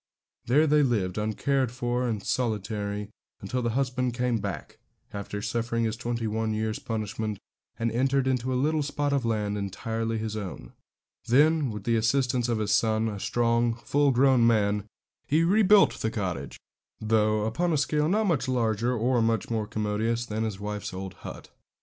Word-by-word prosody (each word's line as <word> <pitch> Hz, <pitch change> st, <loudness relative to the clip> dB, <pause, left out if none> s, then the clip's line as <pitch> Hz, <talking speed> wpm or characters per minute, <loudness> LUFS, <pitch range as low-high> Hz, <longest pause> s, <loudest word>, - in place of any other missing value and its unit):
There 145 Hz, +6 st, +4 dB
they 150 Hz, 0 st, +4 dB
lived, 105 Hz, -9 st, 0 dB
uncared 125 Hz, +4 st, 0 dB
for 125 Hz, 0 st, -1 dB
and 110 Hz, -4 st, -2 dB
solitary, 105 Hz, -3 st, -2 dB, 0.3 s
until 125 Hz, +6 st, -3 dB
the 120 Hz, -, 0 dB
husband 125 Hz, -2 st, 0 dB
came 125 Hz, -2 st, 0 dB
back, 100 Hz, -7 st, -6 dB, 0.3 s
after 100 Hz, 0 st, -5 dB
suffering 115 Hz, +1 st, -1 dB
his 110 Hz, -1 st, 0 dB
twenty 115 Hz, 0 st, -3 dB
one 110 Hz, 0 st, -1 dB
years' 110 Hz, 0 st, -2 dB
punishment, 110 Hz, -1 st, -3 dB, 0.4 s
and 115 Hz, 0 st, -1 dB
entered 135 Hz, +3 st, +1 dB
into 130 Hz, -1 st, 0 dB
a -, -, 0 dB
little 150 Hz, +4 st, +1 dB
spot 145 Hz, 0 st, -1 dB
of 135 Hz, -4 st, 0 dB
land 105 Hz, -2 st, -1 dB
entirely 115 Hz, +3 st, -3 dB
his 110 Hz, -1 st, -3 dB
own. 100 Hz, -4 st, -7 dB, 0.5 s
Then, 150 Hz, +3 st, +4 dB
with 105 Hz, -2 st, -6 dB
the 115 Hz, +1 st, +2 dB
assistance 125 Hz, +1 st, +1 dB
of 115 Hz, -, +1 dB
his 105 Hz, -2 st, -1 dB
son, 110 Hz, +2 st, +2 dB
a 105 Hz, -2 st, -5 dB
strong, 115 Hz, +3 st, +1 dB
full 140 Hz, +4 st, +1 dB
grown 130 Hz, 0 st, +4 dB
young 115 Hz, -, +5 dB
man, 105 Hz, -2 st, +2 dB, 0.4 s
he 155 Hz, +3 st, +3 dB
rebuilt 205 Hz, +2 st, +5 dB
the 110 Hz, -, 0 dB
cottage, 90 Hz, -11 st, -4 dB, 0.4 s
though 110 Hz, -1 st, +2 dB
upon 170 Hz, +11 st, 0 dB
a 155 Hz, -, +2 dB
scale 150 Hz, +2 st, +1 dB
not 215 Hz, +4 st, +2 dB
much 165 Hz, -9 st, +1 dB
larger 120 Hz, -1 st, +1 dB
or 120 Hz, +2 st, +2 dB
much 115 Hz, -1 st, 0 dB
more 110 Hz, -2 st, -1 dB
commodious 110 Hz, +3 st, -1 dB
than 110 Hz, 0 st, -2 dB
his 105 Hz, -3 st, -4 dB
wife's 105 Hz, -2 st, -5 dB
old 95 Hz, 0 st, -6 dB
hut. -, -, -9 dB
115 Hz, 175 wpm, -27 LUFS, 105-130 Hz, 0.5 s, young